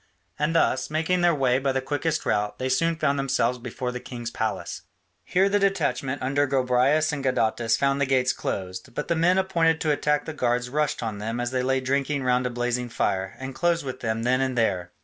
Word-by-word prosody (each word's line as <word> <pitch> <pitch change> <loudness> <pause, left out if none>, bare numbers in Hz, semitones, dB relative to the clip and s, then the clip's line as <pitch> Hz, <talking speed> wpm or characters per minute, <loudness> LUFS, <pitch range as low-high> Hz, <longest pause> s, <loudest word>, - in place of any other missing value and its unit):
And 150 +3 0
thus, 130 -5 +2
making 160 +4 0
their 175 -2 +4
way 130 -2 +2
by 135 0 0
the 135 - +1
quickest 145 +4 -2
route, 105 0 0
they 130 - -2
soon 165 +6 +2
found 145 -3 0
themselves 125 -2 0
before 125 +1 -4
the 125 - -5
king's 120 -2 -7
palace. 110 -2 -3 0.4
Here 190 +2 +2
the 205 +1 +2
detachment 140 -9 0
under 140 +2 +1
Gobryas 135 +4 +2
and 140 -2 -3
Gadatas 115 -3 +1
found 140 0 +1
the 140 - +2
gates 130 -1 +2
closed, 95 +3 -5
but 150 - -4
the 170 - +2
men 175 +3 +3
appointed 170 -4 +2
to 155 - +2
attack 150 0 +1
the 160 - -5
guards 125 -3 0
rushed 150 -2 0
on 110 -3 -4
them 115 +3 -3
as 120 0 -2
they 130 -1 0
lay 130 +1 +1
drinking 140 +2 0
round 125 0 +2
a - - -2
blazing 120 0 -2
fire, 95 -4 -1
and 130 0 -6
closed 170 +3 0
with 130 -1 -5
them 115 -1 -2
then 130 +2 +2
and 130 -2 -1
there. 90 -6 0
130 Hz, 215 wpm, -25 LUFS, 125-150 Hz, 0.4 s, their